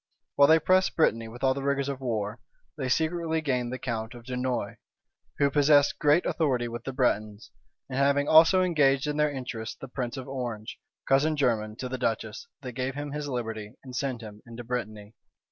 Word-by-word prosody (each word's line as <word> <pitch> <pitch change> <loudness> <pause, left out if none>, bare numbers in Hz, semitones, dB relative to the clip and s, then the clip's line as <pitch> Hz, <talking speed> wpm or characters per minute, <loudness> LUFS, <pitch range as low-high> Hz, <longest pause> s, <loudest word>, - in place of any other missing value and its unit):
While 140 - +6
they 160 +2 +7
pressed 185 +3 +2
Brittany 115 -8 +2
with 120 +3 -10
all 130 0 +4
the 140 - -5
rigors 140 0 0
of 135 -1 -4
war, 110 -3 -2 0.4
they 135 -4 -3
secretly 160 +3 0
gained 125 -5 -1
the 130 - -3
count 115 -1 -4
of 120 - -11
Dunois, 125 0 -2 0.6
who 140 -1 +3
possessed 145 0 +4
great 150 +4 +4
authority 130 -7 0
with 120 0 -7
the 135 - -3
Bretons; 110 -4 -1 0.4
and 135 0 -3
having 140 +1 +3
also 165 +4 +7
engaged 145 -6 +3
in 150 0 -2
their 150 0 +3
interests 125 -5 -5
the 135 - -7
prince 125 0 -4
of 130 - -6
Orange, 120 -4 -5 0.3
cousin 150 +3 +3
german 110 -6 0
to 125 - -5
the 130 0 -5
duchess, 110 -2 -2 0.2
they 125 - -5
gave 130 +2 -3
him 145 0 -5
his 150 0 -4
liberty, 110 -4 -4
and 130 -2 -9
sent 130 -2 -2
him 105 -1 -10
into 115 +1 -8
Brittany. 110 -3 -5
130 Hz, 195 wpm, -27 LUFS, 120-145 Hz, 0.6 s, they